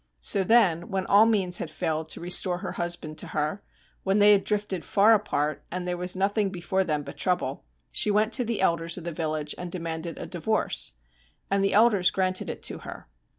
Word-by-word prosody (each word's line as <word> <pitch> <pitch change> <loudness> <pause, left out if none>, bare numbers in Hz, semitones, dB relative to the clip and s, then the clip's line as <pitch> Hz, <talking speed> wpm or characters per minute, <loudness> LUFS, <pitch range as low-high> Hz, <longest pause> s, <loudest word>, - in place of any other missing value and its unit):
So 195 - +3
then 185 -6 +3
when 190 -1 -2
all 210 +3 +5
means 190 -5 +1
had 160 - -4
failed 160 0 -3
to - - -3
restore 180 +1 +1
her - - -5
husband 170 -3 -4
to - - -4
her, 155 +6 -1 0.4
when 195 +1 +1
they 205 0 +6
had 200 -1 +4
drifted 205 -4 -2
far 210 +2 +4
apart 155 -8 -1
and 180 0 -4
there 180 - -1
was 180 +1 -1
nothing 200 +2 +1
before 190 +1 -1
them 150 -4 -2
but - - -10
trouble, 180 - -1 0.3
she - - +1
went 215 +2 +2
to 250 - +5
the 230 -3 -2
elders 170 -2 0
of 180 - -7
the 170 - -4
village 155 -2 -3
and 180 -1 -6
demanded 165 -1 -5
a - - -6
divorce. 175 - -1 0.6
And 195 0 +2
the 195 - +1
elders 210 -4 +5
granted 185 -1 -1
it - - -7
to - - -2
her. - - -10
180 Hz, 205 wpm, -26 LUFS, 165-205 Hz, 0.6 s, they